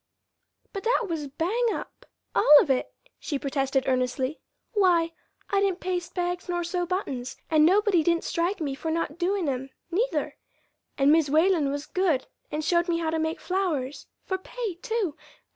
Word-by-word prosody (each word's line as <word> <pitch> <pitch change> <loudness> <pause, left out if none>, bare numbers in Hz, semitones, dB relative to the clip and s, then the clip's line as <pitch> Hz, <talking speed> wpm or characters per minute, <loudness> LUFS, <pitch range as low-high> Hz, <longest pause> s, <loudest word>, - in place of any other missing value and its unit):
"But 395 - -4
that 475 +1 +2
was 310 -3 -3
bang 370 - 0
up - - -8 0.3
all 295 0 +8
of 285 - +2
it," 260 - 0 0.3
she 290 - -2
protested 270 -1 0
earnestly. 255 +2 0 0.3
"Why, 350 -5 +3 0.4
I 395 -1 +3
didn't 385 -2 +1
paste 355 -1 -3
bags 355 0 -2
nor 350 0 0
sew 350 +1 -2
buttons, 275 -9 -3
and 310 0 +6
nobody 400 -1 +4
didn't 335 +1 +1
strike 350 +3 -1
me 290 -4 -2
for 310 +4 -4
not 330 0 -2
doin' 370 -1 0
'em, 265 0 -2 0.2
neither; 460 +9 -1 0.6
and 275 +1 +5
Mis' 315 -2 +4
Whalen 320 -1 +3
was 285 +1 -3
good 340 -8 +1 0.3
and 300 0 -2
showed 345 +2 +2
me 335 - +2
how 325 -1 -1
to 320 - 0
make 320 +1 -1
flowers 325 -8 -2 0.2
for 375 -1 -2
pay, 455 +1 -4
too! 445 -10 -1
335 Hz, 170 wpm, -26 LUFS, 290-375 Hz, 0.6 s, all